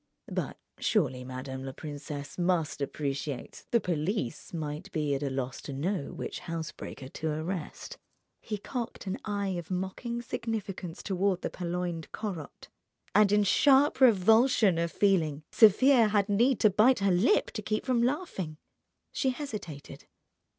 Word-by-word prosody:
"But - - -3 0.2
surely 135 - +1
madame 130 +1 -6
la 135 0 -5
princesse 145 -1 -7
must 175 -5 0
appreciate 140 -1 -4
the 235 - +4
police 175 - -2
might 160 +3 -5
be 150 -3 0
at 135 - -1
a 140 - -1
loss 130 -1 -3
to 140 - -7
know 150 +3 -2
which - - -5
housebreaker 160 -5 -6
to 160 +3 -3
arrest." 155 +2 -4 0.4
He 215 - -4
cocked 235 +2 -5
an 190 0 -3
eye 205 -2 -1
of 170 - -9
mocking 190 +6 -3
significance 200 -8 -4
toward 190 -1 0
the - - -2
purloined 175 -2 -3
"Corot," 185 -9 -6 0.5
and 210 -1 +5
in 210 0 +4
sharp 275 +7 +4
revulsion 220 -3 +5
of 170 0 0
feeling 160 -7 +2
Sofia 235 +3 +6
had 205 -1 +2
need 235 +5 +3
to 215 - +6
bite 230 +7 +5
her 200 -2 +2
lip 190 - +3
to - - -4
keep 215 - -2
from 255 -3 +2
laughing. 240 - -2 0.5
She 265 - 0
hesitated. 215 - -6
185 Hz, 145 wpm, -29 LUFS, 150-215 Hz, 0.5 s, Sofia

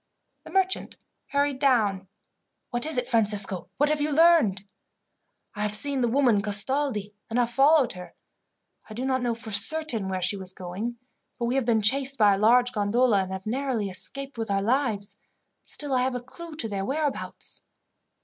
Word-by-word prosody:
The - - -10
merchant 380 -1 -1 0.3
hurried 280 -1 0
down. 215 -9 +1 0.6
"What 240 +5 +2
is 315 - +1
it, 250 -1 -1
Francisco? 205 -6 +1
What 290 +2 +2
have 305 -1 0
you 300 +1 0
learned?" 300 - +4 0.9
"I 210 - -6
have 210 0 0
seen 280 +3 +2
the 240 - +2
woman 240 -4 +2
Castaldi, 210 +1 +1 0.2
and 230 - -2
have 240 -1 +1
followed 275 0 +4
her. 180 -1 -11 0.7
I 215 - -9
do 250 +3 -3
not 260 -1 0
know 240 -2 -1
for 225 -1 -8
certain 225 -1 +1
where 185 -1 -3
she 205 - 0
was 185 -1 -6
going, 195 +7 -6 0.4
for 240 - -2
we 240 - -1
have 265 -2 0
been 220 -2 +2
chased 270 +4 +3
by 210 -2 +5
a 195 - -1
large 245 +3 +4
gondola, 215 0 +2
and 190 0 -5
have 190 0 -6
narrowly 235 -4 -2
escaped 275 +7 -3
with 225 -1 -3
our 195 0 0
lives. 215 -5 -1 0.4
Still, 290 -2 -4
I 255 - +2
have 255 0 -1
a - - -2
clue 315 +6 -11
to 245 -7 -1
their 200 -2 -3
whereabouts." 290 +5 -4
240 Hz, 185 wpm, -26 LUFS, 205-275 Hz, 0.9 s, by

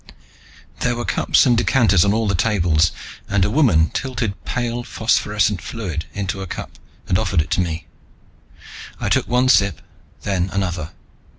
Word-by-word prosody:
There 120 -1 0
were 120 - -4
cups - - +3
and 125 -2 +4
decanters 115 -7 +3
on 100 - +2
all 110 +1 0
the 100 - +1
tables, 85 -5 +2 0.4
and 100 -3 +2
a 105 - -1
woman 100 - +3
tilted 115 -7 -3
pale, 120 -1 -2
phosphorescent 105 -4 0
fluid 90 -8 -5
into 95 -1 -4
a 95 - -5
cup - - -8 0.3
and 90 - +2
offered 90 - 0
it 75 - -7
to - - +2
me. 85 -1 -3 1.1
I - - -2
took - - +1
one 125 +1 +2
sip, 100 - +3 0.4
then 95 -2 -1
another. 90 -5 -2
100 Hz, 160 wpm, -20 LUFS, 90-115 Hz, 1.1 s, and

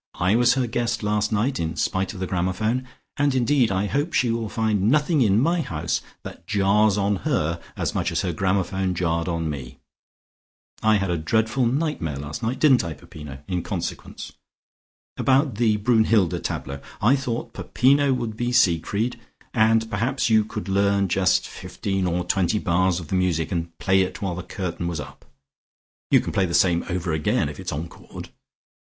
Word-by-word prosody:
I 90 +4 +3
was 120 +1 +4
her 130 -2 +1
guest 120 0 -2
last 105 +1 0
night 120 +6 0
in 80 0 -2
spite 95 +4 -1
of - - -8
the 95 - -2
gramophone, 95 +8 -1 0.3
and 145 -2 +2
indeed 125 -2 +2
I 95 +1 0
hope 145 - -1
she 120 -2 +2
will 115 -2 -2
find 110 -2 +1
nothing 150 +2 +2
in 105 -3 +4
my 165 +6 +2
house 85 - -2 0.2
that 85 - -10
jars 105 +1 +3
on 100 0 +1
her 85 - -1 0.2
as - - -1
much - - -1
as - - 0
her 90 - -2
gramophone 95 0 0
jarred 85 -1 -1
on 85 -2 -1
me. 70 -5 -6 1.0
I 110 0 +4
had 95 -3 0
a 85 - -1
dreadful 110 +9 +1
nightmare 130 - -1
last 75 - -6
night 115 +3 -1
didn't 135 -8 +5
I, 85 -2 -4
Peppino? 70 -3 -11
in 90 -2 -1
consequence. - - -5 0.8
About 135 -3 +2
the 110 -2 +2
Brunnhilde 110 -4 +2
tableaux, 70 +1 -4 0.2
I 120 +6 +4
thought 125 -4 -4
Peppino 140 +2 +2
would 120 -4 -2
be 120 +2 -2
Siegfried 110 +1 +1 0.3
and 115 -1 +3
perhaps 115 +4 -1
you 110 -1 +5
could 105 0 -6
learn 100 0 +2
just 95 0 +2
fifteen 95 -2 -3
or 90 0 0
twenty 95 +3 +1
bars 90 -1 +1
of 80 -4 -10
the - - -1
music 90 -3 0
and 85 -2 -3
play 95 0 +3
it 95 0 -2
while 95 -3 -2
the 90 - -5
curtain 85 -2 -4
was 85 -3 -3
up. - - -10 0.8
You - - +5
can - - -5
play 95 -2 +2
the 85 - -2
same 85 -2 +3
over 90 -2 -2
again 80 -1 +1
if - - -9
it - - -9
is - - -1
encored. 80 +3 -8
100 Hz, 185 wpm, -23 LUFS, 90-120 Hz, 1.0 s, didn't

